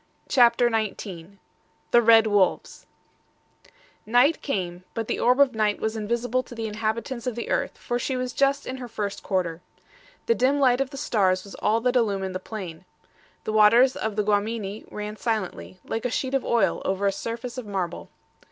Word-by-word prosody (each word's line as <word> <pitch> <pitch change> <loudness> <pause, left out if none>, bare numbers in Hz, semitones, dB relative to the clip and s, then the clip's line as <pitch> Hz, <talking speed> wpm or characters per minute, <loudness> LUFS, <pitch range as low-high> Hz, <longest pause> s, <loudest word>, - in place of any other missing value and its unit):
CHAPTER 240 -1 +5
XIX 200 -4 -4 0.5
THE 240 - +6
RED 225 -1 +6
WOLVES 205 -3 0 1.2
NIGHT 245 +8 +4
came, 180 -9 -3
but 225 -1 -3
the - - -2
orb 250 +2 +3
of 280 -3 +5
night 215 -2 0
was 220 0 -2
invisible 235 +3 -1
to 250 - -12
the 225 -1 -4
inhabitants 225 +3 -3
of 250 - -2
the 235 - -5
earth, - - -1
for 240 0 -3
she 260 +1 -2
was 255 0 -3
just 275 0 +1
in 260 - -5
her 250 -1 -7
first 210 -3 -4
quarter. 180 -4 -2 0.6
The 465 - +3
dim 280 - +2
light 255 -1 +4
of 270 - -1
the 275 - -9
stars 190 -9 +1
was 200 - -12
all 220 +2 0
that 250 +1 +1
illumined 200 -5 0
the 185 - -3
plain. 185 -5 -7 0.6
The 215 - -3
waters 230 +5 +6
of 220 -1 -3
the 210 - +1
Guamini 210 0 -1
ran 210 0 -6
silently, 215 -5 -3
like 225 +2 -4
a - - +1
sheet 260 +2 -2
of 270 - +1
oil 235 -4 +1
over 195 +1 -1
a 200 - +3
surface 230 +5 -5
of 235 - -8
marble. 190 -4 -4
225 Hz, 185 wpm, -25 LUFS, 200-245 Hz, 1.2 s, THE